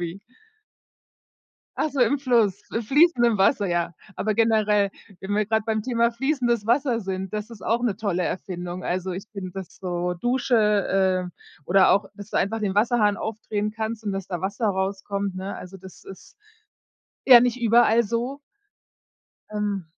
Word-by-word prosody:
wie? 175 +2 -5 1.6
Ach 310 - 0
so, 280 - -6
im 265 +4 +3
Fluss, 235 -8 +1
im 225 - -1
fließenden 245 -3 +4
Wasser, 200 +2 +3
ja. 175 -1 -1 0.2
Aber 215 0 -1
generell, 210 -3 +2 0.3
wenn 200 +1 -3
wir 215 - +2
grad 220 0 0
beim 220 -1 0
Thema 235 0 +1
fließendes 240 -4 0
Wasser 245 0 +2
sind, 190 -2 -5
das 210 +1 -4
ist 225 -4 -12
auch 235 +2 0
'ne 225 -6 0
tolle 195 -5 -1
Erfindung, 180 0 -5
also 185 +1 -2
ich 185 +2 -5
finde, 195 -3 -6
dass 190 -1 -9
so 180 -1 -2
Dusche, 200 -5 +1
äh, 145 - -23
oder 190 +3 +4
auch, 200 0 +3
dass 205 +1 -11
du - - -2
einfach 220 +4 0
den 200 -2 -2
Wasserhahn 210 -2 +3
aufdrehen 215 -1 -3
kannst 220 0 -4
und, 205 - -2
dass 195 -1 -5
da 175 -3 -4
Wasser 200 +4 -2
rauskommt, 195 0 -2
ne, 190 +2 -5
also 180 +1 -10
das 190 0 -14
ist 195 - -13 0.9
ja 250 -3 +10
nicht 245 +1 +1
überall 235 0 +4
so. 235 +5 -3 1.1
Ähm. 205 -4 -2
210 Hz, 165 wpm, -24 LUFS, 190-230 Hz, 1.6 s, ja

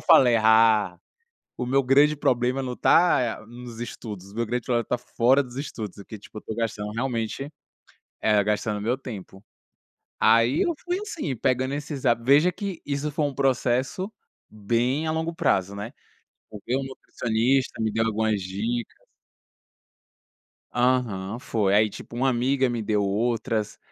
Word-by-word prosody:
falei: 135 -8 +6
"Ah, 110 -4 +4 0.6
o 125 - -2
meu 135 +2 +2
grande 145 +4 +4
problema 130 -1 +1
não 125 -1 -4
tá, 175 -3 +5 0.2
eh, - - -17
nos 120 -1 -10
estudos, 100 -5 -7
o - - -15
meu 115 0 0
grande 120 +1 -2
problema 120 -2 0
tá 125 - -1
fora 125 +3 +2
dos 125 0 -11
estudos", 110 -8 -6
porque 105 +2 -9
tipo, 105 - -13
eu - - -23
tô 110 - -5
gastando 105 -2 -3
realmente 125 +3 -3 0.7
eh, 105 -2 +3
gastando 105 0 -1
o - - -6
meu 120 +4 0
tempo. 100 -6 -9 0.8
Aí 115 +5 +4
eu 340 - 0
fui 355 +2 -1
assim, 340 - -4
pegando 130 +3 0
esses 145 -2 -5
hábitos 120 +1 +1
veja 150 +6 +6
que, 195 -1 -5
isso 145 +1 -2
foi 150 +1 -1
um 145 - -2
processo 135 - 0 0.4
bem 120 +8 0
a - - 0
longo 160 +1 -2
prazo, 100 - 0
né. 105 +6 -6 0.6
O 105 -2 -9
meu 130 +3 0
nutricionista 130 -1 -1
me 110 - +1
deu 110 +1 +1
algumas 110 -2 0
dicas. 110 +6 -4 1.7
Aham, 120 -5 0
foi. 110 -6 0
Aí 105 +1 +4
tipo, 115 - -10
uma 130 +2 +2
amiga 130 +1 +1
me 120 -2 -2
deu 105 -1 0
outras. 110 +1 -1
120 Hz, 160 wpm, -25 LUFS, 110-135 Hz, 1.7 s, falei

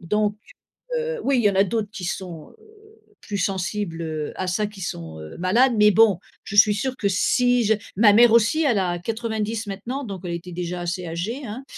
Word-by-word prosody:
Donc, 210 +4 0 0.6
heu, 480 0 -3
oui, 275 -2 +2
il 230 - +1
y 205 - +5
en - - -5
a 195 - +5
d'autres 210 +1 -2
qui 190 - -7
sont, 175 -3 -6
heu, 435 0 -23
plus 205 - -5
sensibles, 190 -2 -2
heu, 155 -2 -4
à 185 - -3
ça, 205 +4 0
qui 205 -2 -12
sont, 80 - -6
heu, 75 0 -10
malades, 235 +8 +3
mais 210 0 +6
bon, 210 -3 +5 0.3
je 205 - -6
suis 210 0 +7
sûre 260 +5 -2
que 200 - 0
si 245 +5 +2
je 220 +1 +3 0.2
ma 210 -1 +6
mère 235 +1 +6
aussi, 235 +8 +4
elle 240 -8 +2
a 175 -2 -1
90 220 +1 -3
maintenant. 235 +8 -5
Donc 195 -5 -7
elle 175 - -4
était 175 +1 -7
déjà 175 0 -4
assez 175 +1 -3
âgée, 205 - -4
hein, 230 +5 -7
210 Hz, 215 wpm, -23 LUFS, 180-230 Hz, 0.6 s, suis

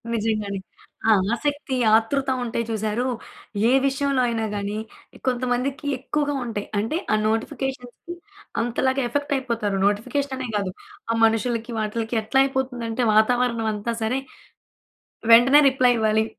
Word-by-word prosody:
నిజంగానే. 215 -3 -1 0.5
ఆ - - +7 0.2
ఆసక్తి, 285 +2 -2 0.2
ఆతృత 265 +5 +1
ఉంటాయి 235 0 -2
చూశారు! 220 +2 -1 0.6
ఏ - - +3
విషయంలో 275 -1 +1
అయినా 225 -2 -1
గానీ, 205 +1 -3 0.5
కొంతమందికి 255 +3 -1
ఎక్కువగా 290 +2 -1
ఉంటాయి. 215 -3 -4
అంటే 225 +10 -1 0.2
ఆ - - +5
నోటిఫికేషన్స్‌కి 250 +6 -3 0.5
అంతలాగా 260 +3 0
ఎఫెక్ట్ 285 +4 -2
అయిపోతారు. 230 -6 -1
నోటిఫికేషన్ 260 +7 -1
అనే 260 - -4
కాదు, 195 -2 -1 0.4
ఆ - - +2
మనుషులకి 230 +1 0
వాటిలకి 220 +2 -2
ఎట్లా 240 +5 +1
అయిపోతుంది 265 -3 -2
అంటే 225 +2 -1
వాతావరణం 230 +1 +2
అంతా 210 +3 -3
సరే. 240 +4 0 1.1
వెంటనే 260 +5 +8
రిప్లై 255 -2 +3
ఇవ్వాలి, 220 0 +2
240 Hz, 125 wpm, -23 LUFS, 220-265 Hz, 1.1 s, వెంటనే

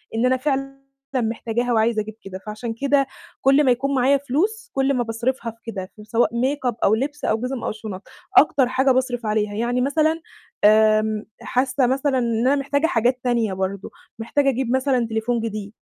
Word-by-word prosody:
إن 225 +2 +1
أنا 255 0 +3
فعلًا 275 0 -3 0.3
محتاجاها 235 0 -1
وعايزة 220 0 +2
أجيب 215 0 -8
كده، 190 -1 -8
فعشان 220 +2 -5
كده 275 +2 +1 0.3
كُلّ 275 +2 +5
ما 255 - +4
يكون 275 +3 0
معايا 265 +2 +4
فلوس، 390 - -2
كُلّ 270 +1 +1
ما 245 -2 +1
باصرفها 235 +1 -2
في 225 - -24
كده، 190 -2 -6
سواء 230 +1 +1
ميك 265 +2 -1
أب 245 -3 +1
أو 215 - +4
لبس 290 +5 -3
أو 220 - +2
جِزَم 250 0 -3
أو - - -1
شُنَط، 215 -3 -7 0.4
أكتر 285 -7 +5
حاجة 260 +1 +2
باصرف 250 -2 0
عليها، 210 -1 0
يعني 240 +3 0
مثلًا 315 +4 +1 0.4
آمم 215 0 +4 0.2
حاسة 255 0 +1
مثلًا 270 +1 +1
إن 235 0 0
أنا 280 - +4
محتاجة 285 +3 0
حاجات 245 +1 +1
تانية 235 -5 +1
برضه، 190 +1 -4 0.3
محتاجة 275 +5 +1
أجيب 255 -1 -1
مثلًا 260 -3 +1
تليفون 225 +2 -1
جديد، 215 -2 -5
245 Hz, 180 wpm, -22 LUFS, 220-275 Hz, 0.4 s, كُلّ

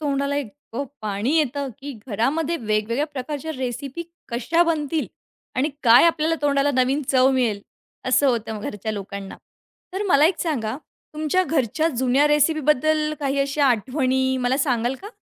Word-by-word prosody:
तोंडाला 280 -1 -1
इतकं 280 0 -5 0.2
पाणी 215 +7 -1
येतं 285 -2 0
की 280 0 -7
घरामध्ये 280 +9 0
वेगवेगळ्या 225 +3 -1
प्रकारच्या 295 +2 -5
रेसिपी 265 +5 -4 0.3
कशा 245 +9 +1
बनतील 315 -2 -1 0.5
आणि 265 +4 +2
काय 235 +3 +7
आपल्याला 325 -1 +2
तोंडाला 285 0 +2
नवीन 260 +3 +2
चव 260 0 +4
मिळेल, 240 -6 0 0.5
असं 270 +2 +4
होतं 220 -3 -2
घरच्या 210 0 -4
लोकांना. 200 -1 -7 0.6
तर 385 +2 -2
मला 295 -2 +6
एक 335 -1 0
सांगा, 260 -9 -2 0.4
तुमच्या 310 +4 +1
घरच्या 310 - 0
जुन्या 260 0 +2
रेसिपीबद्दल 305 0 +2
काही 280 -1 -1
अशा 280 +1 +1
आठवणी 260 +2 +1
मला 250 +1 +1
सांगाल 250 -3 +1
का? 410 - -7
275 Hz, 140 wpm, -23 LUFS, 245-300 Hz, 0.6 s, काय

